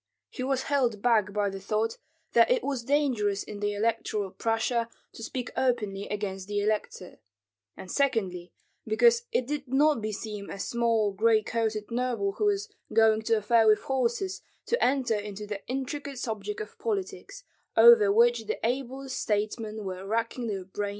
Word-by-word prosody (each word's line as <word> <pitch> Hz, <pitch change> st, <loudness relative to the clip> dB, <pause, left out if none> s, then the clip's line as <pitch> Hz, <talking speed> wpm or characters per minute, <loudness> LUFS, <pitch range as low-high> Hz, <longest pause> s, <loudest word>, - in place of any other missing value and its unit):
He -, -, -7 dB
was 265 Hz, 0 st, 0 dB
held 245 Hz, -7 st, 0 dB
back 220 Hz, -4 st, +3 dB
by 205 Hz, -1 st, 0 dB
the 195 Hz, -, -6 dB
thought 215 Hz, +3 st, -1 dB, 0.3 s
that -, -, +5 dB
it -, -, +2 dB
was 270 Hz, -4 st, -2 dB
dangerous 240 Hz, -8 st, +1 dB
in 205 Hz, -1 st, -8 dB
Electoral 205 Hz, -1 st, -1 dB
Prussia 230 Hz, +2 st, 0 dB, 0.2 s
to -, -, -11 dB
speak 250 Hz, +2 st, -5 dB
openly 210 Hz, -6 st, 0 dB
against 195 Hz, -2 st, -4 dB
the 205 Hz, 0 st, -1 dB
elector; 205 Hz, -3 st, -2 dB, 0.6 s
and 185 Hz, -, -8 dB
secondly, 190 Hz, -, 0 dB, 0.4 s
because 235 Hz, +2 st, +4 dB
it 255 Hz, -, +1 dB
did 285 Hz, +1 st, -4 dB
not 285 Hz, 0 st, +3 dB
beseem 210 Hz, -1 st, -5 dB
a -, -, -6 dB
small 230 Hz, -1 st, +1 dB
gray 220 Hz, +2 st, +3 dB
coated 220 Hz, -1 st, -2 dB
noble 235 Hz, -5 st, 0 dB
who 420 Hz, -, -2 dB
was 415 Hz, +1 st, 0 dB, 0.2 s
going 220 Hz, -1 st, +4 dB
to 225 Hz, +1 st, +2 dB
a 215 Hz, -, -4 dB
fair 225 Hz, +1 st, +4 dB
with 215 Hz, 0 st, +5 dB
horses, 265 Hz, +9 st, -1 dB, 0.2 s
to 475 Hz, -, +1 dB
enter 260 Hz, -3 st, +2 dB
into 210 Hz, 0 st, -4 dB
the 205 Hz, -1 st, -6 dB
intricate 270 Hz, +2 st, -4 dB
subject 245 Hz, -, -4 dB
of 455 Hz, +1 st, -9 dB
politics, 420 Hz, +3 st, -4 dB, 0.3 s
over 465 Hz, -4 st, +8 dB
which 475 Hz, +3 st, +3 dB
the 440 Hz, -, -2 dB
ablest 265 Hz, +2 st, -3 dB
statesmen 215 Hz, +1 st, -2 dB
were 185 Hz, 0 st, -5 dB
racking 230 Hz, +4 st, -2 dB
their 195 Hz, -3 st, -3 dB
brains 190 Hz, -, -32 dB
to -, -, -3 dB
no -, -, +1 dB
purpose. -, -, -3 dB
230 Hz, 170 wpm, -28 LUFS, 210-270 Hz, 0.6 s, over